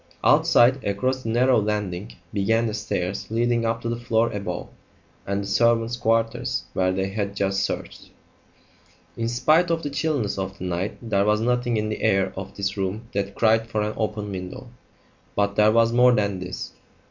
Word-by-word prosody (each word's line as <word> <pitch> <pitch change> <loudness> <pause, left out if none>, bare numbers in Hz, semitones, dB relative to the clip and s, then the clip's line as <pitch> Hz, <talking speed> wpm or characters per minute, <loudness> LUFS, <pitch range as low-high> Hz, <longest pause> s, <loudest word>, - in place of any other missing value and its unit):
Outside, 130 +3 +4
across 130 +7 -1
the 115 - -5
narrow 125 0 +3
landing, 105 -3 -3 0.2
began 110 +3 +2
the 110 - -2
stairs 100 -3 -3
leading 115 +1 +1
up 115 0 -1
to - - -2
the 120 0 -3
floor 115 -1 +1
above, 100 -4 -4 0.6
and 100 +1 -1
the - - -6
servants' 115 +2 +2
quarters 115 +2 0
where 95 0 +1
they 95 +1 -1
had 100 0 -3
just 95 0 0
searched. - - -4 1.1
In 115 - -2
spite 155 +9 +3
of 165 -1 0
the 145 - -3
chilliness 140 -10 -1
of 95 0 -4
the - - -8
night 90 +2 -2
there 100 -3 +2
was 105 0 +3
something 120 0 +1
in 105 0 -1
the 110 - -4
air 95 -3 +2
of 95 - -7
this 100 0 -2
room 100 +4 -3
that 100 0 -2
cried 110 0 +3
for 110 -2 -1
an 105 +1 -2
open 105 -1 -3
window. 95 +6 -7 0.7
But 100 0 +1
there 105 0 +5
was 115 +1 +3
more 125 +1 +6
than 100 -3 0
this. 90 0 -6
110 Hz, 180 wpm, -24 LUFS, 100-115 Hz, 1.1 s, more